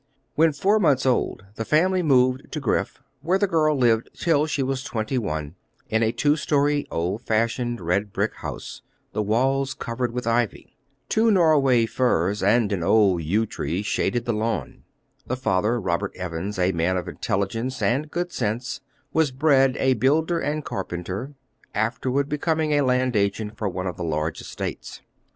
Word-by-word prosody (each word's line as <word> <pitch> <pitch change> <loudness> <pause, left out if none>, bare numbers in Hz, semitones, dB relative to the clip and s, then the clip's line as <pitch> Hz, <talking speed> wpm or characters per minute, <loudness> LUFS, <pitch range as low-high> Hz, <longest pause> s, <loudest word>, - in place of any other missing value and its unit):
When 160 +1 +4
four 195 +9 +2
months 145 -9 +3
old 120 -6 0
the 115 - -2
family 180 +8 +2
moved 130 -4 +2
to 155 - -2
Griff, 110 -7 -1 0.2
where 175 +6 +2
the 200 - +2
girl 155 -5 +2
lived 115 -3 +2
till 155 -3 +2
she 145 -3 -1
was 130 0 -2
twenty 115 +2 -2
one, 75 -7 -4 0.4
in 110 +1 +1
a 110 -1 +2
two 145 +5 +2
story, 145 -1 +1
old 90 +7 -2
fashioned, 115 +2 0
red 95 +4 -1
brick - - -1
house, - - -7 0.3
the 110 - 0
walls 130 +6 +1
covered 120 0 -3
with 125 +1 -4
ivy. 115 -1 -1 0.3
Two 225 +1 +3
Norway 150 - +4
firs 105 -4 0
and 105 +2 +3
an 95 -4 -1
old 95 -1 +3
yew 100 +8 +1
tree 95 -2 -3
shaded 120 +2 -1
the 120 - 0
lawn. 110 +2 -3 0.5
The 130 - -2
father, 110 0 +1
Robert 95 0 -2
Evans, 90 +2 -4
a 90 +1 +2
man 85 +1 0
of 90 - -4
intelligence 115 +7 -2
and 140 +6 0
good 175 +2 -3
sense, 120 0 -3 0.3
was 160 -2 +3
bred 135 -1 +3
a 130 0 +3
builder 155 +8 +2
and 150 0 -2
carpenter, 95 +8 -5 0.4
afterward 125 +5 0
becoming 155 +1 0
a 145 - +3
land 125 -2 +1
agent 105 +1 0
for 110 -3 -2
one 90 0 -4
of 90 - -4
the 90 - -4
large 80 -1 -2
estates. - - -6
120 Hz, 170 wpm, -24 LUFS, 100-145 Hz, 0.5 s, When